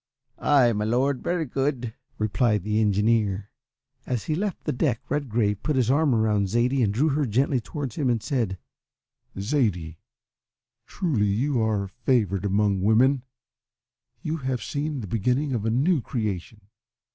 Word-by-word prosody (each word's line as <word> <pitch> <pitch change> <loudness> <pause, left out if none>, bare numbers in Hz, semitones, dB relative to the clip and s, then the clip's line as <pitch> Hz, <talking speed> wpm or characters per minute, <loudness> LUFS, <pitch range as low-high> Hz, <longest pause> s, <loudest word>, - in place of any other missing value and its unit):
"Ay, 130 -5 +4
my 105 0 -1
Lord, 125 +4 +1
very 175 -2 -1
good," 130 -3 -2 0.2
replied 110 -1 +1
the 105 +2 +1
engineer. 105 -1 +1 0.6
As 125 -3 -1
he 155 - -2
left 195 +4 -2
the - - -1
deck 125 -3 0
Redgrave 115 -8 0
put 150 - -1
his 125 -2 +2
arm 145 -2 +3
round 105 -3 +2
Zaidie 125 +5 +1
and 105 -4 +2
drew 135 +10 +2
her 145 -1 0
gently 130 +4 +1
towards 135 -1 -6
him 140 -4 +1
and 115 -3 0
said, 115 -9 -1 0.8
"Zaidie, 95 - -1 0.9
truly 130 - 0
you 120 +5 +1
are 105 -3 0
favoured 105 -3 0
among 100 -1 +1
women! 125 +7 +4 1.0
You 160 0 -2
have 130 -4 -3
seen 145 -1 -3
the 105 - -6
beginning 125 +8 0
of 110 -3 -2
a - - +2
new 140 +7 +2
creation. 105 -3 -4
120 Hz, 150 wpm, -25 LUFS, 105-140 Hz, 1.0 s, Ay